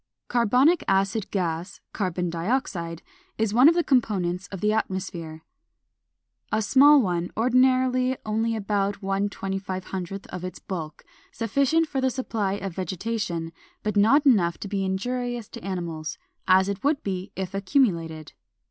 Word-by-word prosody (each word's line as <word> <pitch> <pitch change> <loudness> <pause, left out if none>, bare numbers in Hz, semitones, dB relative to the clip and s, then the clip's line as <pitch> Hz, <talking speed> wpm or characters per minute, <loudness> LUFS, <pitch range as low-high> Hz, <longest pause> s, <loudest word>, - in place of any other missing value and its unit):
Carbonic 250 - +3
acid 195 +2 +1
gas 175 0 -3
(Carbon 180 -3 -2
dioxide) 170 - -2 0.3
is 220 -2 0
one 250 +6 +7
of 335 - +2
the 345 - +2
components 195 - 0
of 195 - -7
the 210 +3 +2
atmosphere, 180 -6 -3 1.1
a 220 0 +1
small 285 +6 +7
one, 175 -6 0
ordinarily 255 +1 +3
only 225 +1 0
about 200 -1 -1
1/2500 195 -1 -3
of 180 - -6
its 185 - -5
bulk, 160 -5 -6 0.3
sufficient 280 +8 +1
for 270 -3 -2
the 260 - +2
supply 225 -6 -2
of 195 -2 -4
vegetation, 185 -2 -3 0.3
but 210 0 -1
not 230 +9 +5
enough 185 -11 +4
to - - -6
be 195 -1 -2
injurious 240 +4 -2
to - - -10
animals, 170 -4 -4 0.3
as 190 0 +5
it 200 -1 -4
would 285 +1 +1
be 190 -1 -4
if 190 0 -4
accumulated. 175 - 0
200 Hz, 140 wpm, -25 LUFS, 185-245 Hz, 1.1 s, one